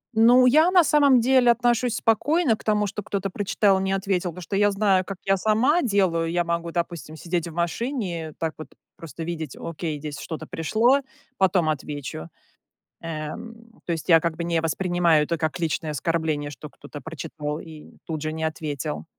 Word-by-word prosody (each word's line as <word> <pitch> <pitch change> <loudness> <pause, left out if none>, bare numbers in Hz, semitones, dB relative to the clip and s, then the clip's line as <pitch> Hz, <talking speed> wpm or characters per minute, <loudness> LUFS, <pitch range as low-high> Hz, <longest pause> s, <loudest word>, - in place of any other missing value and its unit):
Ну, 245 +3 +6
я 310 +7 +5
на 365 -1 +6
самом 285 -4 +5
деле 250 0 +4
отношусь 240 0 +2
спокойно 275 +4 +2
к - - -17
тому, 210 -1 +1
что 205 +1 -4
кто-то 195 -1 -3
прочитал 200 0 +2
и - - -2
не 190 - -1
ответил, 190 -2 -1
потому 180 +2 -9
что 195 - -4
я 205 +1 +4
знаю, 195 -2 +2
как 195 0 -7
я 195 0 +3
сама 225 - +2
делаю. 185 - +1
Я 175 0 +1
могу, 170 0 -2
допустим, 170 -2 -4
сидеть 170 +1 -2
в - - -7
машине, 175 - -3
так 160 -1 -2
вот 155 - -7 0.3
просто 165 0 -8
видеть: 160 -4 -5
"Окей, 165 -2 -4
здесь 145 0 -7
что-то 160 -1 -6
пришло, 220 - +2 0.4
потом 185 -3 +2
отвечу". 145 - -5 0.7
Эм, 225 +9 -8
то - - -2
есть 165 -1 -3
я 165 -2 +7
как 165 0 -2
бы 170 - -3
не 170 -1 0
воспринимаю 170 -1 +2
это 165 +2 -2
как 155 +1 -2
личное 160 -1 -1
оскорбление, 150 0 -1
что 145 +2 -10
кто-то 145 0 -11
прочитал 150 0 -5
и 160 -2 -12
тут 160 -3 -4
же 155 0 -2
не 160 0 -4
ответил. 155 -2 -3
175 Hz, 185 wpm, -24 LUFS, 160-215 Hz, 0.7 s, я